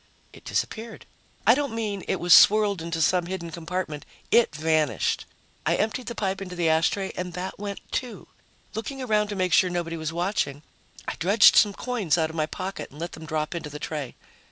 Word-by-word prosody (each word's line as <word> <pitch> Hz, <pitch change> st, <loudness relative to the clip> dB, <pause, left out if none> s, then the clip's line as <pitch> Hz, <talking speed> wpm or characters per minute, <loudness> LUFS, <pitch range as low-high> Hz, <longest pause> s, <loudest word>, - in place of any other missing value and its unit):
It -, -, -15 dB
disappeared. 225 Hz, 0 st, -3 dB, 0.4 s
I 225 Hz, -, +8 dB
don't 280 Hz, -3 st, -1 dB
mean 210 Hz, -4 st, -3 dB
it -, -, 0 dB
was 175 Hz, -1 st, +5 dB
swirled 205 Hz, -3 st, +6 dB
into 165 Hz, -1 st, -1 dB
some 180 Hz, 0 st, +2 dB
hidden 175 Hz, -2 st, -5 dB
compartment. 165 Hz, -2 st, -4 dB, 0.3 s
It 230 Hz, -10 st, +4 dB
vanished. 155 Hz, -, 0 dB, 0.4 s
I -, -, +2 dB
emptied 225 Hz, +3 st, -1 dB
the 235 Hz, -, -4 dB
pipe 195 Hz, -2 st, -2 dB
into 180 Hz, -2 st, -6 dB
the 175 Hz, -2 st, 0 dB
ashtray 165 Hz, +5 st, +1 dB
and 180 Hz, -1 st, -4 dB
that 185 Hz, +2 st, -5 dB
went, 200 Hz, -1 st, -5 dB
too. 250 Hz, -2 st, -4 dB, 0.5 s
Looking 270 Hz, +5 st, -5 dB
around 210 Hz, -3 st, +2 dB
to 205 Hz, -, -5 dB
make 185 Hz, -3 st, 0 dB
sure 185 Hz, -, +5 dB
nobody 170 Hz, -1 st, -3 dB
was 160 Hz, 0 st, -3 dB
watching, 170 Hz, -5 st, -2 dB, 0.4 s
I -, -, -1 dB
dredged 200 Hz, +5 st, +6 dB
some 205 Hz, -1 st, +5 dB
coins 220 Hz, -10 st, 0 dB
out 160 Hz, -1 st, 0 dB
of -, -, -11 dB
my 155 Hz, -1 st, 0 dB
pocket 190 Hz, +4 st, -5 dB
and 145 Hz, -, -15 dB
let 170 Hz, +1 st, -4 dB
them 160 Hz, 0 st, -10 dB
drop 155 Hz, +1 st, -2 dB
into 165 Hz, -3 st, -5 dB
the 150 Hz, -, -7 dB
tray. 150 Hz, -4 st, -5 dB
180 Hz, 200 wpm, -25 LUFS, 160-210 Hz, 0.5 s, I